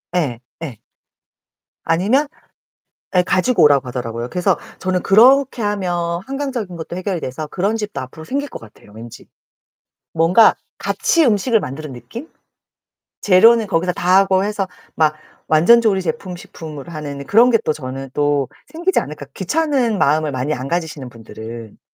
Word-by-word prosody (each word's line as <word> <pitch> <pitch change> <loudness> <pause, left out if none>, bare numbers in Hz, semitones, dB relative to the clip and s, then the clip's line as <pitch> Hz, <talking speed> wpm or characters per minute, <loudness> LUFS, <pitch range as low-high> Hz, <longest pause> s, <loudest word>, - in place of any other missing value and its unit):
예, 140 -10 0 0.2
예. 140 -9 -6 1.1
아니면 210 - +2 0.9
예, 180 - +6
가지고 185 +7 +2
오라고 140 -3 +4
하더라고요. 120 -1 -4
그래서 180 +3 0 0.2
저는 185 -1 -1
그렇게 255 +4 +5
하면 175 -4 -1
환경적인 265 -9 -4
것도 165 +1 -7
해결이 185 -1 -3
돼서 145 +4 -5
그런 200 +8 -1
집도 210 -2 -4
앞으로 130 +5 -10
생길 285 - -3
것 - - -7
같아요, 105 -2 -17
왠지. 115 +2 -11 0.9
뭔가 165 +7 +5 0.2
같이 335 -2 +1
음식을 225 -1 +2
만드는 145 -1 -6
느낌? 230 - -9 0.9
재료는 220 +4 +5
거기서 180 -1 0
다 180 +1 +2
하고 190 -1 +3
해서 205 -1 -2 0.3
막 155 -1 +3 0.3
완전 170 +10 +5
조리 205 -4 +2
제품, 180 +2 -4
식품으로 160 -2 -10
하는 145 -3 -6
그런 235 - +5
게 230 - +4
또 155 - +1
저는 135 -1 -7
또 145 -2 +1 0.2
생기지 350 +4 0
않을까 145 0 -8
귀찮은 255 - 0
마음을 155 0 +2
많이 130 +4 -1
안 130 +2 -5
가지시는 160 -6 -3
분들은. 115 -1 -10
175 Hz, 325 characters per minute, -19 LUFS, 145-215 Hz, 1.1 s, 예